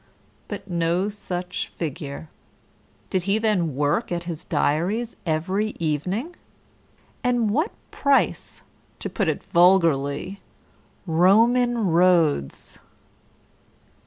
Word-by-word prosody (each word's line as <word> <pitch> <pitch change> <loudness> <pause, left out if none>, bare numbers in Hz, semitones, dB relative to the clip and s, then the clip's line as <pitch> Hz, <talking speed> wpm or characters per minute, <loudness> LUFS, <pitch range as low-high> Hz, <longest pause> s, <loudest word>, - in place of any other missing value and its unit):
But 205 -1 -7
no 175 +2 0
such 180 -3 -4
figure. 150 -1 -5 0.8
Did 185 - +1
he 200 - +3
then 195 - 0
work 145 - 0
at 175 -1 -2
his 170 -1 -6
diaries 185 +9 0
every 185 +7 -1
evening? 180 - -2 0.9
And 245 -4 +1
what 305 - +1 0.2
price, 280 -1 0 0.3
to - - -5
put 200 -6 -1
it 155 - -1
vulgarly, 170 -1 +2 0.6
Roman 225 +7 +3
roads? 165 - +2
180 Hz, 95 wpm, -23 LUFS, 160-215 Hz, 0.9 s, he